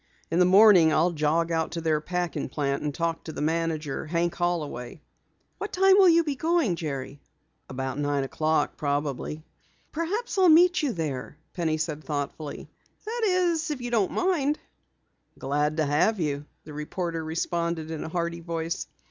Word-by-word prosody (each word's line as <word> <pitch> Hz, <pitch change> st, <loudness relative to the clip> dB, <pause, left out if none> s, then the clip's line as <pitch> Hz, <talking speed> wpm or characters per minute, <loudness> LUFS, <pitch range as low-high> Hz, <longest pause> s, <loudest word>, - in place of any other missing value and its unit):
In 165 Hz, -, +2 dB
the 180 Hz, -, +6 dB
morning 185 Hz, -3 st, +7 dB
I'll 165 Hz, +3 st, +3 dB
jog 165 Hz, +1 st, +1 dB
out 160 Hz, -1 st, 0 dB
to 170 Hz, -, -3 dB
their 155 Hz, -2 st, +1 dB
packing 175 Hz, +2 st, -3 dB
plant 140 Hz, -2 st, -1 dB
and 150 Hz, -, -2 dB
talk 165 Hz, +2 st, -2 dB
to 160 Hz, -, -5 dB
the -, -, -7 dB
manager, 160 Hz, -2 st, -1 dB
Hank 170 Hz, +1 st, 0 dB
Holloway." 160 Hz, -7 st, -3 dB, 0.6 s
"What 415 Hz, -, -4 dB
time 385 Hz, +1 st, +5 dB
will 390 Hz, -2 st, +7 dB
you 335 Hz, 0 st, +5 dB
be 295 Hz, -3 st, -2 dB
going, 320 Hz, -, +1 dB
Jerry?" 140 Hz, -3 st, -5 dB, 0.5 s
"About 130 Hz, +1 st, -4 dB
nine 145 Hz, -1 st, 0 dB
o'clock 155 Hz, +4 st, 0 dB
probably." 145 Hz, +1 st, -2 dB, 0.5 s
"Perhaps 390 Hz, +7 st, -2 dB
I'll 370 Hz, -2 st, +6 dB
meet 350 Hz, +3 st, +6 dB
you 290 Hz, -4 st, 0 dB
there," 150 Hz, -, -4 dB, 0.2 s
Penny 160 Hz, -3 st, 0 dB
said 155 Hz, -1 st, -3 dB
thoughtfully. 145 Hz, 0 st, -5 dB, 0.4 s
"That 465 Hz, +2 st, -3 dB
is, 350 Hz, -3 st, +1 dB
if 295 Hz, -3 st, -3 dB
you 245 Hz, -1 st, -5 dB
don't 215 Hz, -6 st, +2 dB
mind." 310 Hz, -6 st, +1 dB, 0.8 s
"Glad 150 Hz, +3 st, -1 dB
to 155 Hz, -, +2 dB
have 150 Hz, +9 st, +2 dB
you," 145 Hz, -3 st, -2 dB, 0.2 s
the 150 Hz, -, -10 dB
reporter 165 Hz, +2 st, -4 dB
responded 165 Hz, 0 st, -2 dB
in 160 Hz, -, -4 dB
a -, -, -5 dB
hearty 170 Hz, 0 st, -2 dB
voice. 165 Hz, +1 st, -3 dB
165 Hz, 165 wpm, -26 LUFS, 150-220 Hz, 0.8 s, morning